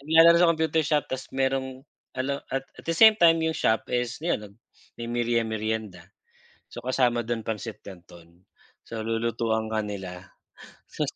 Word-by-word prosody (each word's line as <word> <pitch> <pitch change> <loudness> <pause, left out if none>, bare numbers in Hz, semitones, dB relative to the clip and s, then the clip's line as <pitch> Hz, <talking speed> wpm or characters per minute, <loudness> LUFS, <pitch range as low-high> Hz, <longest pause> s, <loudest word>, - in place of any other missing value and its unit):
naglalaro 165 +3 +6
sa 175 - +6
computer 160 -1 +1
shop 150 -1 +1
ta's 130 0 -5
mayrong 130 0 -2 0.3
alo 140 +2 -2
at 135 0 -2 0.2
at - - -23
the 165 - 0
same 220 +2 +9
time 165 -1 +5
'yong 160 - +1
shop 110 -7 +1
is 125 0 -1
'yon 170 - 0
nag 100 -1 -12 0.4
may 120 - -6
merie-merienda. 110 -5 -2 0.6
So - - -10
kasama 120 -2 +1
do'n 115 -1 -2
pansit 110 0 -5
canton, 85 -2 -15 0.4
so 115 -1 -6
lulutuan 115 0 -1
ka 110 0 -1
nila. 95 -2 -7 0.6
Sus - - -3
120 Hz, 155 wpm, -26 LUFS, 110-135 Hz, 0.6 s, same